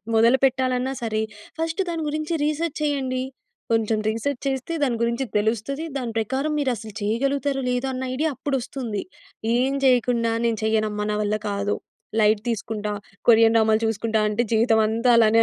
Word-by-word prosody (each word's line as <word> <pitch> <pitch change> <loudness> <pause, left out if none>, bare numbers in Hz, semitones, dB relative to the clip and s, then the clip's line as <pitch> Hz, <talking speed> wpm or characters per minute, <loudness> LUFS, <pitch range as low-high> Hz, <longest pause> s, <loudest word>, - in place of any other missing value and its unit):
మొదలు 235 +3 +5
పెట్టాలన్నా 255 0 +1
సరే 220 -1 0 0.4
ఫస్ట్ 325 +4 -1
దాని 330 -2 -2
గురించి 310 +2 -2
రీసర్చ్ 305 +1 -1
చేయండి. 265 -3 0 0.5
కొంచెం 220 -1 +1
రీసర్చ్ 240 +4 -2
చేస్తే 270 +4 -2
దాని 240 -3 0
గురించి 235 +3 0
తెలుస్తది. 230 +8 -1
దాని 245 -4 -3
ప్రకారం 265 +7 -1
మీరసలు 225 -6 -2
చేయగలుగుతారో 270 +5 0
లేదోన్న 255 +1 -2
ఐడియా 310 +2 0
అప్పుడొస్తుంది. 255 -5 -3 0.5
ఏం 260 +3 +2
జేయకుండా 245 -2 +3
"నేను 225 -2 0
చేయనమ్మ. 215 -1 0
నా 210 - 0
వల్ల 210 +1 0
కాదు. 200 +1 -1 0.5
లైట్ 210 0 +4
తీసుకుంటా. 210 -1 -3 0.4
కొరియన్ 225 0 +6
డ్రామాలు 220 0 +3
చూసుకుంటా" 220 0 0
అంటే 230 +3 0
జీవితమంతా 225 +1 +3
అలానే 225 0 +5
235 Hz, 140 wpm, -23 LUFS, 220-270 Hz, 0.5 s, కొరియన్